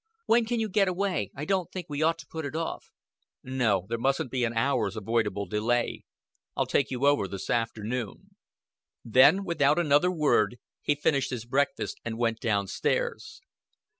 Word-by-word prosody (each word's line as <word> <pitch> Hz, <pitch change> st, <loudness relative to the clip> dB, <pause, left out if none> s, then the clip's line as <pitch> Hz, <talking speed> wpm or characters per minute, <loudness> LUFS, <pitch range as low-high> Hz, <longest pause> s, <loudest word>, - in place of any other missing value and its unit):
"When 235 Hz, 0 st, +4 dB
can 235 Hz, +1 st, -1 dB
you 220 Hz, -, 0 dB
get 200 Hz, -1 st, +2 dB
away? 185 Hz, -, -1 dB
I 145 Hz, -, -5 dB
don't 185 Hz, -1 st, -1 dB
think 185 Hz, -3 st, -5 dB
we 145 Hz, 0 st, -4 dB
ought 165 Hz, +1 st, +2 dB
to -, -, -11 dB
put 160 Hz, -1 st, -6 dB
it 145 Hz, +1 st, -5 dB
off." 165 Hz, 0 st, -4 dB, 0.5 s
"No. 125 Hz, -8 st, 0 dB
There 115 Hz, +1 st, -3 dB
mustn't 135 Hz, 0 st, 0 dB
be 130 Hz, -2 st, 0 dB
an 115 Hz, -1 st, 0 dB
hour's 115 Hz, -5 st, +1 dB
avoidable 105 Hz, -2 st, -1 dB
delay. 110 Hz, +5 st, -1 dB, 0.5 s
I'll -, -, +2 dB
take 140 Hz, -, +1 dB
you 130 Hz, +1 st, -1 dB
over 140 Hz, -9 st, +3 dB
this 95 Hz, 0 st, -5 dB
afternoon." 115 Hz, 0 st, -3 dB, 0.7 s
Then, 135 Hz, -, +5 dB
without 165 Hz, -5 st, +2 dB
another 150 Hz, +1 st, +3 dB
word, 145 Hz, -, +2 dB, 0.2 s
he 145 Hz, -, +1 dB
finished 140 Hz, -1 st, +1 dB
his 120 Hz, -3 st, -5 dB
breakfast 140 Hz, +3 st, -1 dB
and 115 Hz, -1 st, -4 dB
went 115 Hz, -1 st, 0 dB
down 100 Hz, -3 st, 0 dB
stairs. 455 Hz, -, -2 dB
130 Hz, 170 wpm, -28 LUFS, 115-165 Hz, 0.7 s, Then